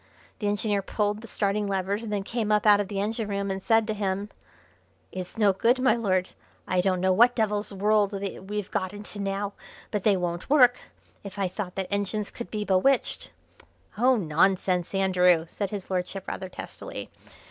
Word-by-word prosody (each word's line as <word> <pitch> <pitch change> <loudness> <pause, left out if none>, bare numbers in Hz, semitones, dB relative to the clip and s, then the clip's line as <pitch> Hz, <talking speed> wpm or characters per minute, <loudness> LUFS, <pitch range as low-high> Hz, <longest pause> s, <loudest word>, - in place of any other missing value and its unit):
The 210 - -1
engineer 205 0 0
pulled 210 +1 -1
the 230 - -10
starting 205 -1 -1
levers, 200 +2 -1
and 220 - -5
then 205 -2 -1
came 220 0 -2
up 210 0 +3
out 205 -1 +7
of 205 - -1
the 195 0 -3
engine 220 +2 -2
room 200 -1 -1
and 190 0 -3
said 225 +2 +3
to 215 - -2
him: 200 0 -2 0.8
"It's 185 +3 -7
no 205 -3 +4
good, 235 +6 +3
my 255 -1 +4
Lord; 185 -5 0 0.4
I 180 -1 +2
don't 185 -1 +1
know 185 0 +3
what 240 +5 +5
devil's 210 -2 0
world 205 +1 +2
we've 200 +1 -4
got 185 0 -2
into 205 0 -7
now, 200 +1 -2 0.4
but 210 - -1
they 200 -1 +3
won't 175 +2 -3
work. 250 -4 +6 0.4
If 200 -1 -9
I 195 -1 +1
thought 185 0 -5
that 190 0 -3
engines 205 +1 -2
could 235 - -7
be 210 -1 -3
bewitched 205 +8 +2 0.3
" - - -30
"Oh, 255 +2 +5
nonsense, 180 0 +1
Andrew!" 180 -3 +3
said 200 +3 -3
his 200 -2 -6
lordship 185 +1 -3
rather 190 - -5
testily. - - -8
200 Hz, 190 wpm, -26 LUFS, 190-210 Hz, 0.8 s, out